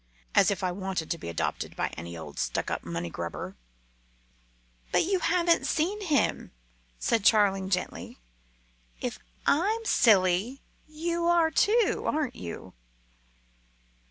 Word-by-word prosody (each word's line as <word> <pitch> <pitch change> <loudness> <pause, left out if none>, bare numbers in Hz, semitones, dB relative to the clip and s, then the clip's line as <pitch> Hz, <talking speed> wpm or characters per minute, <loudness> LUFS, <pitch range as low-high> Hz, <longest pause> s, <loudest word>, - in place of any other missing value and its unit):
As - - +5
if 195 -2 -2
I 180 - +1
wanted 190 -3 -3
to 170 - -2
be 85 - -6
adopted 85 - -3
by - - -1
any 85 +1 -8
old 75 -3 -8
stuck - - -1
up - - -3
money 85 0 -4
grubber!" 85 +3 -5 1.4
"But - - +3
you 380 +2 +1
haven't 340 -2 +2
seen 370 +7 0
him," 310 -8 +1 0.5
said 225 - +1
Charling 195 -3 +4
gently. 180 -2 -3 0.8
"If - - -4 0.3
I'm 425 +9 +2
silly, 205 - +3 0.3
you 335 +2 -2
are 340 -2 +4
too, 440 +7 +2
aren't 300 -4 0
you?" 85 -2 -8
220 Hz, 130 wpm, -28 LUFS, -, 1.4 s, As